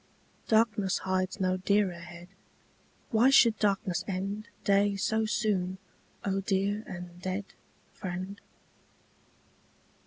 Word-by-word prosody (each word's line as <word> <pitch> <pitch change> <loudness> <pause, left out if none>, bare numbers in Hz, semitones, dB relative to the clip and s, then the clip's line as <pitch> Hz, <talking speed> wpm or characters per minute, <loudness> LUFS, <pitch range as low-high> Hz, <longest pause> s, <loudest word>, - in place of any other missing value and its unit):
Darkness 215 -4 +3
hides 185 +1 -1
no 185 -1 +1
dearer 200 0 +2
head: 175 0 -11 0.8
Why 235 +3 +5
should 235 -5 +6
darkness 195 -3 +1
end 200 +3 -3 0.2
Day 200 0 +3
so 220 +2 0
soon, 190 -5 0 0.5
O 195 -1 +1
dear 200 +2 0
and 180 -1 -8
dead 190 +2 -2 0.5
Friend? 185 +2 -5
195 Hz, 100 wpm, -29 LUFS, 185-210 Hz, 0.8 s, should